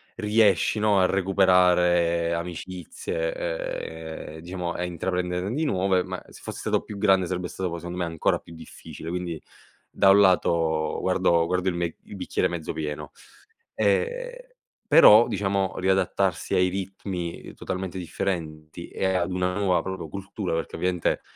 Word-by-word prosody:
riesci, 105 -2 +2
no, 105 -2 +3
a 95 - +5
recuperare 90 -3 +3
amicizie, 435 - -5
ehm, - - -10
diciamo, 90 +1 -4
a 90 - -3
intraprenderne 90 +2 -2
di 155 +5 -1
nuove. 95 -6 +2
Ma - - -5
se - - -15
fossi - - -7
stato - - 0
più 105 - -9
grande, 95 -3 +3
sarebbe 90 0 -3
stato, 95 -1 -3
poi, 85 - -4
secondo 90 +2 -6
me, 90 - 0
ancora 80 -2 0
più 85 - -14
difficile. 80 0 -10
Quindi, 85 -2 -4 0.5
da 95 - +4
un 100 +1 +7
lato, 85 -4 +2
guardo 85 -1 +2
guardo 90 +1 0
il - - -5
mec 85 -1 -2
il - - -11
bicchiere - - -1
mezzo 85 -2 -5
pieno. 75 -2 -5 0.6
E - - -1 0.3
però, 110 +3 +8
diciamo, 95 -1 -1
riadattarsi 95 -1 0
ai 90 0 +4
ritmi 95 -2 -5
totalmente 95 0 -5
differenti 80 -2 -4
e - - -3
ad 90 0 0
una 90 0 -1
nuova, 95 -3 +2
proprio, 95 0 -5
cultura, 95 -1 -5
perché, 80 0 -3
ovviamente, 90 0 0
90 Hz, 150 wpm, -25 LUFS, 85-100 Hz, 0.6 s, però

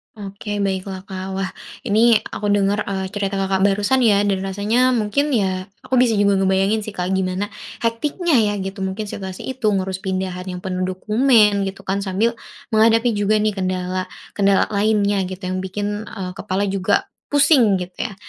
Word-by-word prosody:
Oke, 205 0 -5
baiklah, 190 -1 -3
Kak. 190 -1 -6
Wah, 190 -1 -2 0.3
ini 230 +1 +4 0.2
aku 205 - -3
denger, 205 0 +1
eee, 190 -1 -2
cerita 200 -1 -2
Kakak 190 0 0
barusan 205 +6 +2
ya, 205 -3 +4
dan 195 -2 +1
rasanya 205 +6 +1
mungkin 230 +7 0
ya, 190 -2 -1 0.2
aku - - -8
bisa 235 -3 +3
juga 200 -1 +3
ngebayangin 195 +3 +2
sih, 215 - -6
Kak, 180 +1 -2
gimana 190 +2 -1 0.3
hektiknya 295 +9 0
ya, 205 -1 +2
gitu, 195 0 -5
mungkin 190 +3 -2
situasi 190 -2 -7
itu 260 -4 -2
ngurus 190 -1 -1
pindahan 185 -1 -3
yang 180 -1 -5
penuh 185 -1 -2
dokumen, 210 +1 +3
gitu, 195 - -7
kan, 195 +1 -1
sambil 205 +4 0 0.4
menghadapi 225 +2 +4
juga 205 +1 +1
nih, 210 0 +1
kendala-kendala 185 +1 -1
lainnya, 205 -1 +2
gitu, 185 +1 -8
yang 185 0 -2
bikin, 205 +3 -4
eee, 185 -2 -5
kepala 200 0 -2
juga 195 - +1 0.2
pusing, 275 -8 +5
gitu, 185 +6 -4
ya. 195 - -11
200 Hz, 165 wpm, -20 LUFS, 190-215 Hz, 0.4 s, pusing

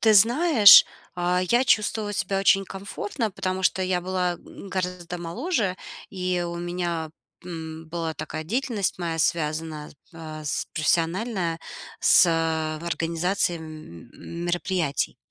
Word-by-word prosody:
Ты 220 -1 +5
знаешь, 235 - +8 0.3
а 180 0 +1
я 240 +2 +4
чувствовала 215 -2 +1
себя 195 +1 -1
очень 195 0 +4
комфортно, 205 +4 -4
потому 185 0 -3
что 185 +1 +2
я 185 -1 0
была, 180 0 -1
м, 195 - -12
гораздо 180 -2 -4
моложе, 210 - -2 0.3
и 180 -2 -1
у 170 0 -5
меня, 175 -2 -3 0.3
м, 160 -2 -7
была 165 -1 -3
такая 155 +1 -6
деятельность 220 - -1
моя, 165 -2 -3
связанная 155 -1 -1
с - - -17 0.2
па 155 -1 -8
с 145 - -2
профессиональная, 170 +2 0 0.4
с - - +6 0.6
организацией, 170 +2 0
м, 155 - -11 0.4
мероприятий. 175 -4 -1
180 Hz, 125 wpm, -25 LUFS, 165-195 Hz, 0.6 s, знаешь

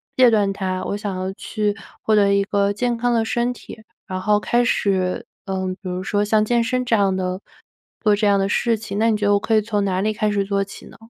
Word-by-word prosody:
戒 255 -2 +6
断 205 -3 +2
它， 185 -1 -3
我 - - -2
想 205 -2 -4
要 185 +1 -3
去 210 +1 -2 0.3
获 220 - +1
得 200 -1 +4
一 200 - +3
个 200 0 +1
健 240 +4 -1
康 240 +1 0
的 230 -1 +2
身 240 +2 0
体， 245 - -10 0.3
然 185 0 -4
后 210 +2 +3
开 240 +3 +1
始， 195 -1 0 0.2
呃， 190 -2 -2 0.2
比 190 - -6
如 180 +1 -3
说 205 +1 0
像 215 +1 +2
健 235 +1 +2
身 250 +2 -1
这 230 - +2
样 195 -3 +2
的 185 0 -3 0.6
做 210 -2 +4
这 210 +1 +1
样 200 -1 +4
的 195 0 +1
事 230 +2 +1
情， 205 -2 -5
那 225 +1 +3
你 215 - +2
觉 210 - -2
得 205 - +4
我 200 - +3
可 220 +2 0
以 215 - +4
从 210 -2 -1
哪 185 -2 0
里 215 +3 0
开 215 0 0
始 205 -1 0
做 200 0 0
起 195 - -11
呢？ - - -14
205 Hz, 275 characters per minute, -21 LUFS, 195-225 Hz, 0.6 s, 戒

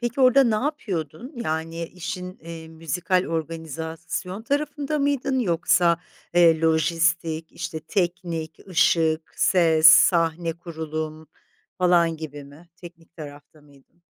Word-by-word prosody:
peki 240 +2 -2
orada 260 +1 +6
ne 225 -2 +2
yapıyordun? 220 - -4
Yani, 165 +1 -3
işin, 180 +1 -7
eee, 165 -1 -9
müzikal 165 +3 -1
organizasyon 165 +4 -5
tarafında 290 +2 -2
mıydın 280 -2 0
yoksa, 170 -4 +2 0.4
eee, 165 -2 +5
lojistik, 165 0 +1
işte, 160 - -6
teknik, 170 -3 -3
ışık, 160 -2 +2
ses, 165 -4 +4
sahne 165 0 +5
kurulum 160 -2 -6 0.5
falan 170 -2 +3
gibi 145 -2 -8
mi? 150 +5 -16
Teknik 170 -2 -14
tarafta 145 0 -11
mıydın? 145 +4 -24
165 Hz, 110 wpm, -24 LUFS, 160-180 Hz, 0.5 s, orada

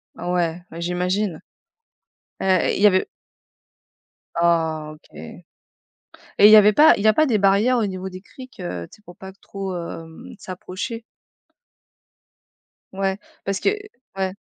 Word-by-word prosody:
Ah 175 - -5
ouais, 175 -1 -1
bah, 165 - -9
j'imagine 180 +1 -2 1.0
et 190 -2 +1
il - - -4
y 210 - +8
avait 185 -2 +2 1.3
Oh 160 -2 0
OK. 155 - -23
Et - - -11 1.0
il 210 - +8
y 215 - +10
avait 210 0 +7
pas 300 +9 +6
il 200 - -4
y - - +4
a 215 - +6
pas 310 +6 +3
des 225 -6 +1
barrières 200 +6 +3
au 215 - +1
niveau 185 0 -5
des 185 0 -10
criques, 255 +5 -14
heu, 90 - -5
tu - - -16
sais, 210 - -27
pour 175 -3 -15
pas 190 0 -10
trop, 195 -1 -7
hem, 165 -1 -9
s'approcher? 185 +5 -7 1.9
Ouais, 195 +1 -2 0.2
parce 195 -1 -2
que - - +2 0.5
ouais. 190 -1 -1
190 Hz, 155 wpm, -22 LUFS, 175-205 Hz, 1.9 s, y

